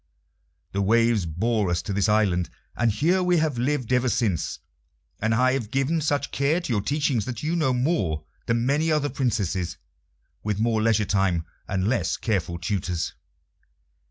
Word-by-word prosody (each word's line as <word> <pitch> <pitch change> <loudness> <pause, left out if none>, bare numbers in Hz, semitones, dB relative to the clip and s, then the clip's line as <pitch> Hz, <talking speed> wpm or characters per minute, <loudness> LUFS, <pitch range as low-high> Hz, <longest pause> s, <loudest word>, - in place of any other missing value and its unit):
The 100 - -1
waves 115 -2 +3
bore 105 +5 0
us 85 -1 0
to 100 - -3
this 100 +2 +1
island, 100 -5 +2 0.3
and 120 -1 +2
here 170 - +2
we 180 -1 +3
have 155 -6 0
lived 130 -1 0
ever 125 0 +3
since, 105 -8 0 0.6
and 110 +1 +1
I 130 +2 +3
have 120 -6 -2
given 135 +5 0
such 145 -2 0
care 145 +5 +1
to 170 -9 -3
your 105 - +1
teaching 140 +1 0
that 120 +4 -4
you 160 +3 0
know 155 -6 +2
more 125 - 0 0.2
than 115 0 +1
many 150 +5 +2
other 150 -2 +1
Princesses 100 -10 -1 0.6
with 105 -1 -2
more 110 -1 +2
leisure 110 -1 +3
time 95 -4 +1 0.2
and 95 0 0
less 110 -9 0
careful 90 -7 -1
tutors." 90 -2 -2
115 Hz, 165 wpm, -25 LUFS, 95-135 Hz, 0.6 s, waves